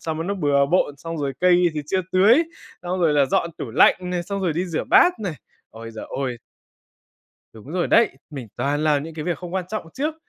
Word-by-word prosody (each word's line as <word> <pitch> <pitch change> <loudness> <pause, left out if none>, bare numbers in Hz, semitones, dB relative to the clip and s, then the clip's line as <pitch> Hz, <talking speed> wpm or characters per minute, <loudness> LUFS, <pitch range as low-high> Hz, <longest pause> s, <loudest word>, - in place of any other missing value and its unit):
sao 160 - -3
mà 160 +1 -4
nó 200 +2 -2
bừa 145 -5 +2
bộn, 145 -2 +1
xong 165 +2 -6
rồi 140 -2 -2
cây 180 0 +4
thì 150 - -2
chưa 190 +4 0
tưới, 215 - +5 0.4
xong 180 +1 -3
rồi 165 -3 +3
là 145 -2 +4
dọn 170 +5 0
tủ 115 - -5
lạnh 125 - +5 0.2
này, 175 -1 -1
xong 200 +2 -4
rồi 175 -4 +1
đi 170 +4 -1
rửa 165 -3 -3
bát 360 - +4
này. 185 -7 -3 0.4
Ôi 115 +1 -10
giời 110 - -7
ôi! 130 -3 -4 1.2
Đúng 115 +7 -12
rồi 180 -1 -1
đấy, 230 - +4 0.2
mình 135 -7 -8
toàn 145 +2 -1
làm 150 -2 +2
những 160 +1 -8
cái 155 -1 -6
việc 175 -2 -1
không 180 -1 -8
quan 190 -2 -2
trọng 215 -5 -5
trước. 300 +4 -2
165 Hz, 235 wpm, -22 LUFS, 145-185 Hz, 1.2 s, tưới